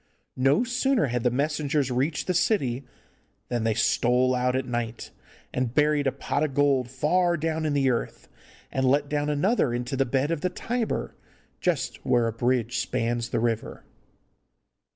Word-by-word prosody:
No 135 Hz, -, +4 dB
sooner 250 Hz, -, +1 dB
had 125 Hz, -2 st, -1 dB
the 125 Hz, -, +2 dB
messengers 145 Hz, +1 st, 0 dB
reached 140 Hz, +5 st, 0 dB
the 185 Hz, -, 0 dB
city 135 Hz, -, 0 dB, 0.6 s
than 120 Hz, -2 st, -1 dB
they 110 Hz, -1 st, +1 dB
stole 125 Hz, +3 st, +2 dB
out 125 Hz, 0 st, +1 dB
at 130 Hz, 0 st, -1 dB
night 120 Hz, -1 st, -4 dB, 0.4 s
and 125 Hz, -2 st, -2 dB
buried 150 Hz, -1 st, +3 dB
a -, -, +2 dB
pot 140 Hz, -, -2 dB
of 140 Hz, -3 st, -2 dB
gold 140 Hz, -4 st, +2 dB
far 170 Hz, +6 st, +1 dB
down 160 Hz, 0 st, -1 dB
in 150 Hz, -, 0 dB
the 135 Hz, -2 st, +3 dB
earth, 120 Hz, -, -4 dB, 0.4 s
and 130 Hz, 0 st, 0 dB
let 140 Hz, +2 st, +2 dB
down 150 Hz, 0 st, 0 dB
another 150 Hz, -, +1 dB
into 125 Hz, +3 st, -3 dB
the 135 Hz, -, +2 dB
bed 135 Hz, +4 st, 0 dB
of 165 Hz, -3 st, -1 dB
the 180 Hz, -, 0 dB
Tiber, 230 Hz, +5 st, -3 dB, 0.5 s
just 165 Hz, -8 st, -1 dB
where 120 Hz, -2 st, +2 dB
a 115 Hz, -, -1 dB
bridge 120 Hz, 0 st, 0 dB
spans 120 Hz, 0 st, -1 dB
the -, -, -1 dB
river. 115 Hz, -1 st, -2 dB
135 Hz, 170 wpm, -26 LUFS, 125-150 Hz, 0.6 s, No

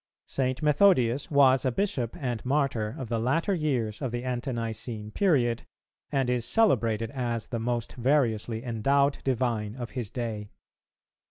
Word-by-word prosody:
St. 130 Hz, +2 st, -2 dB
Methodius 145 Hz, -5 st, +3 dB
was 135 Hz, -3 st, +5 dB
a 130 Hz, -, +1 dB
Bishop 135 Hz, -, -2 dB
and 120 Hz, -5 st, -3 dB
Martyr 130 Hz, -5 st, 0 dB
of 130 Hz, -, -5 dB
the 115 Hz, 0 st, -1 dB
latter 140 Hz, -, +1 dB
years 130 Hz, -, -1 dB
of 130 Hz, -4 st, -2 dB
the 120 Hz, +1 st, -3 dB
Ante 125 Hz, +1 st, -2 dB
nicene 115 Hz, -2 st, -4 dB
period, 125 Hz, -, +1 dB, 0.4 s
and 135 Hz, -3 st, +1 dB
is 125 Hz, -1 st, +1 dB
celebrated 115 Hz, -, +2 dB
as 120 Hz, -4 st, -2 dB
the 115 Hz, -, -2 dB
most 120 Hz, -1 st, -2 dB
variously 120 Hz, -4 st, +1 dB
endowed 135 Hz, +4 st, +1 dB
divine 120 Hz, -5 st, -1 dB
of 120 Hz, -4 st, -6 dB
his 120 Hz, -5 st, -4 dB
day. 110 Hz, -4 st, -4 dB
125 Hz, 150 wpm, -27 LUFS, 115-135 Hz, 0.4 s, was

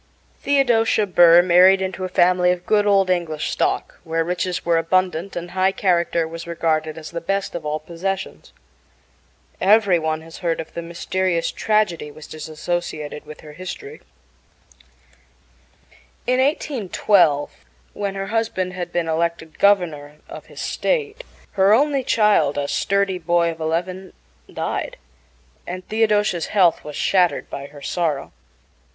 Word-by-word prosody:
Theodosia 240 Hz, -6 st, +2 dB
Burr 175 Hz, -2 st, +6 dB
married 185 Hz, +2 st, +6 dB
into 190 Hz, 0 st, -4 dB
a 185 Hz, -, -3 dB
family 180 Hz, 0 st, +3 dB
of 180 Hz, 0 st, -1 dB
good 210 Hz, -1 st, +2 dB
old 195 Hz, -2 st, +3 dB
English 165 Hz, -4 st, -1 dB
stock, -, -, -1 dB
where 165 Hz, 0 st, -1 dB
riches 180 Hz, +1 st, -3 dB
were 170 Hz, -1 st, +3 dB
abundant, 185 Hz, +1 st, 0 dB
and 175 Hz, 0 st, -5 dB
high 190 Hz, +1 st, +2 dB
character 170 Hz, -3 st, +1 dB
was 165 Hz, +1 st, -8 dB
regarded 160 Hz, -2 st, -1 dB
as 155 Hz, -1 st, -9 dB
the 170 Hz, 0 st, -5 dB
best 195 Hz, +3 st, -2 dB
of 165 Hz, -3 st, -5 dB
all 150 Hz, +1 st, -1 dB
possessions. 175 Hz, +5 st, -5 dB, 1.1 s
Every 200 Hz, -3 st, +4 dB
one 160 Hz, 0 st, -2 dB
has 165 Hz, 0 st, -12 dB
heard 170 Hz, -2 st, -1 dB
of 160 Hz, -, -7 dB
the 170 Hz, -, -4 dB
mysterious 170 Hz, +1 st, -2 dB
tragedy 210 Hz, -8 st, 0 dB
which 150 Hz, +1 st, -12 dB
is 155 Hz, 0 st, -8 dB
associated 155 Hz, -2 st, -4 dB
with 155 Hz, -, -11 dB
her 150 Hz, -1 st, -12 dB
history. 185 Hz, +4 st, -8 dB, 2.2 s
In 255 Hz, +1 st, +1 dB
1812, 205 Hz, -, +2 dB, 0.4 s
when 200 Hz, -1 st, -3 dB
her 195 Hz, 0 st, -4 dB
husband 190 Hz, -5 st, -1 dB
had 175 Hz, -1 st, -5 dB
been 175 Hz, -1 st, -1 dB
elected 160 Hz, 0 st, -2 dB
Governor 160 Hz, -8 st, +2 dB
of -, -, -10 dB
his -, -, -9 dB
state, 460 Hz, -1 st, -2 dB, 0.3 s
her 195 Hz, +2 st, +4 dB
only 280 Hz, +1 st, +1 dB
child 210 Hz, -, +2 dB
a 140 Hz, -1 st, -1 dB
sturdy 200 Hz, +1 st, 0 dB
boy 170 Hz, 0 st, +1 dB
of 165 Hz, -, -11 dB
eleven 180 Hz, +4 st, -3 dB, 0.4 s
died, -, -, -4 dB, 0.7 s
and 185 Hz, +1 st, -6 dB
Theodosia's 210 Hz, -5 st, +1 dB
health 180 Hz, -5 st, +3 dB
was 150 Hz, -1 st, -8 dB
shattered 180 Hz, -3 st, +1 dB
by 140 Hz, 0 st, -6 dB
her 145 Hz, 0 st, -14 dB
sorrow. 155 Hz, -6 st, -2 dB
175 Hz, 145 wpm, -21 LUFS, 165-195 Hz, 2.2 s, Burr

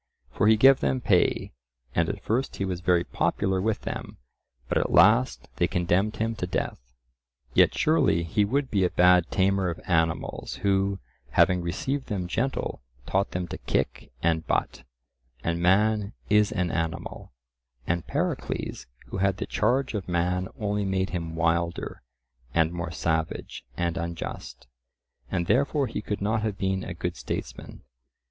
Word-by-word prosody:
For 105 Hz, -, +2 dB
he 110 Hz, 0 st, +6 dB
gave 135 Hz, +4 st, +7 dB
them 130 Hz, -, 0 dB
pay, 95 Hz, -7 st, +2 dB, 0.4 s
and 85 Hz, 0 st, +1 dB
at 100 Hz, -, -5 dB
first 125 Hz, +5 st, -1 dB
he 100 Hz, -, -2 dB
was 90 Hz, -2 st, -3 dB
very 90 Hz, -1 st, +3 dB
popular 95 Hz, +1 st, 0 dB
with 110 Hz, -1 st, 0 dB
them, -, -, -6 dB, 0.5 s
but -, -, +1 dB
at -, -, 0 dB
last -, -, +4 dB
they -, -, +3 dB
condemned 90 Hz, +5 st, +1 dB
him 115 Hz, +1 st, -1 dB
to 90 Hz, -, -2 dB
death. -, -, -2 dB, 0.7 s
Yet -, -, +4 dB
surely 145 Hz, -, +3 dB
he 100 Hz, +6 st, +1 dB
would 135 Hz, +6 st, 0 dB
be 100 Hz, -4 st, +2 dB
a 90 Hz, -, +3 dB
bad 90 Hz, -1 st, +4 dB
tamer 95 Hz, -1 st, +2 dB
of 85 Hz, -, -5 dB
animals 80 Hz, -2 st, 0 dB
who, 100 Hz, 0 st, +2 dB, 0.3 s
having 90 Hz, +7 st, +4 dB
received 130 Hz, +11 st, -2 dB
them 95 Hz, -5 st, -2 dB
gentle, 120 Hz, -, -2 dB, 0.2 s
taught 95 Hz, +1 st, +1 dB
them 90 Hz, -1 st, -3 dB
to -, -, -6 dB
kick -, -, -2 dB
and 80 Hz, -1 st, +1 dB
butt, -, -, -1 dB, 0.6 s
and 85 Hz, +1 st, -1 dB
man 105 Hz, +3 st, +3 dB, 0.2 s
is 105 Hz, 0 st, +4 dB
an 90 Hz, -5 st, -1 dB
animal; 80 Hz, -1 st, -4 dB, 0.5 s
and 85 Hz, -1 st, -1 dB
Pericles -, -, -3 dB, 0.2 s
who -, -, -4 dB
had 95 Hz, 0 st, +1 dB
the -, -, -3 dB
charge 130 Hz, +1 st, +1 dB
of 100 Hz, -4 st, -4 dB
man 90 Hz, +1 st, 0 dB
only 105 Hz, -1 st, -1 dB
made 95 Hz, -1 st, -1 dB
him 85 Hz, -2 st, -4 dB
wilder, 85 Hz, +1 st, -1 dB, 0.5 s
and 80 Hz, -1 st, +3 dB
more 85 Hz, -2 st, -4 dB
savage 80 Hz, -1 st, -2 dB
and 85 Hz, 0 st, -1 dB
unjust, 85 Hz, -1 st, -5 dB, 0.6 s
and 85 Hz, -2 st, -1 dB
therefore 140 Hz, -, +2 dB
he 110 Hz, -, -4 dB
could 105 Hz, -1 st, -4 dB
not 110 Hz, +2 st, +1 dB
have 105 Hz, -3 st, -2 dB
been 95 Hz, -1 st, -1 dB
a -, -, -6 dB
good -, -, -3 dB
statesman. -, -, -6 dB
95 Hz, 160 wpm, -26 LUFS, 85-105 Hz, 0.7 s, gave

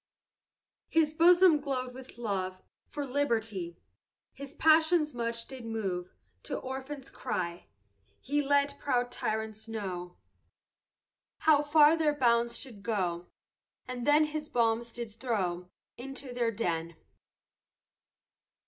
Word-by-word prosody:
His 315 Hz, -2 st, +3 dB
bosom 345 Hz, 0 st, +6 dB
glow'd 255 Hz, -3 st, -3 dB
with 260 Hz, -1 st, -11 dB
love 190 Hz, -5 st, -2 dB, 0.3 s
For 290 Hz, -1 st, -4 dB
liberty, 225 Hz, -10 st, -1 dB, 0.6 s
His 280 Hz, +1 st, -9 dB
passions 315 Hz, 0 st, +4 dB
much 235 Hz, -1 st, -3 dB
did 260 Hz, -2 st, -9 dB
move 195 Hz, -6 st, -3 dB, 0.3 s
To -, -, -4 dB
orphans' 265 Hz, +1 st, -6 dB
cry, 175 Hz, -8 st, -4 dB, 0.5 s
He 290 Hz, +2 st, 0 dB
let 285 Hz, 0 st, +1 dB
proud 245 Hz, -3 st, 0 dB
tyrants 220 Hz, -1 st, -3 dB
know, 185 Hz, -5 st, -5 dB, 1.2 s
How 305 Hz, -2 st, +5 dB
far 295 Hz, +1 st, +6 dB
their 310 Hz, -2 st, +1 dB
bounds 235 Hz, -3 st, +2 dB
should 235 Hz, -7 st, -8 dB
go 180 Hz, -5 st, -1 dB, 0.6 s
And 250 Hz, 0 st, -5 dB
then 295 Hz, +1 st, +6 dB
his 300 Hz, 0 st, -5 dB
bombs 235 Hz, 0 st, +1 dB
did 235 Hz, -2 st, -6 dB
throw 185 Hz, -7 st, -2 dB, 0.3 s
Into 270 Hz, 0 st, -6 dB
their 240 Hz, -1 st, +1 dB
den. 170 Hz, -7 st, -2 dB
245 Hz, 110 wpm, -30 LUFS, 215-285 Hz, 1.2 s, bosom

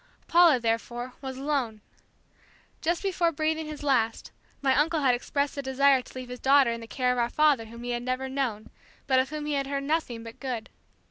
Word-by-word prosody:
Paula, 335 Hz, -6 st, +6 dB
therefore, 240 Hz, +2 st, -2 dB
was 265 Hz, -1 st, -6 dB
alone. 265 Hz, -6 st, -1 dB, 1.0 s
Just 340 Hz, +3 st, 0 dB
before 355 Hz, -3 st, +1 dB
breathing 315 Hz, 0 st, -1 dB
his 300 Hz, -1 st, -7 dB
last, 240 Hz, -6 st, 0 dB, 0.3 s
my 270 Hz, -2 st, +2 dB
uncle 315 Hz, +2 st, +2 dB
had 260 Hz, -3 st, +4 dB
expressed 280 Hz, +3 st, -1 dB
the 280 Hz, -, -4 dB
desire 270 Hz, 0 st, +3 dB
to -, -, -15 dB
leave 255 Hz, -1 st, -7 dB
his 250 Hz, 0 st, -7 dB
daughter 270 Hz, -2 st, +5 dB
in 230 Hz, 0 st, -4 dB
the 230 Hz, -, -9 dB
care 250 Hz, +1 st, 0 dB
of 250 Hz, -, 0 dB
our 235 Hz, 0 st, +1 dB
father 295 Hz, -5 st, +3 dB
whom 235 Hz, +2 st, -10 dB
he 245 Hz, -, -3 dB
had 240 Hz, 0 st, -2 dB
never 255 Hz, +2 st, -2 dB
known, 260 Hz, -6 st, -3 dB, 0.3 s
but 260 Hz, -1 st, +3 dB
of 260 Hz, -, 0 dB
whom 305 Hz, 0 st, -5 dB
he 300 Hz, -, -1 dB
had 275 Hz, -1 st, -1 dB
heard 275 Hz, 0 st, -2 dB
nothing 275 Hz, -6 st, -1 dB
but 230 Hz, 0 st, -10 dB
good. 250 Hz, -5 st, -4 dB
265 Hz, 210 wpm, -27 LUFS, 245-295 Hz, 1.0 s, Paula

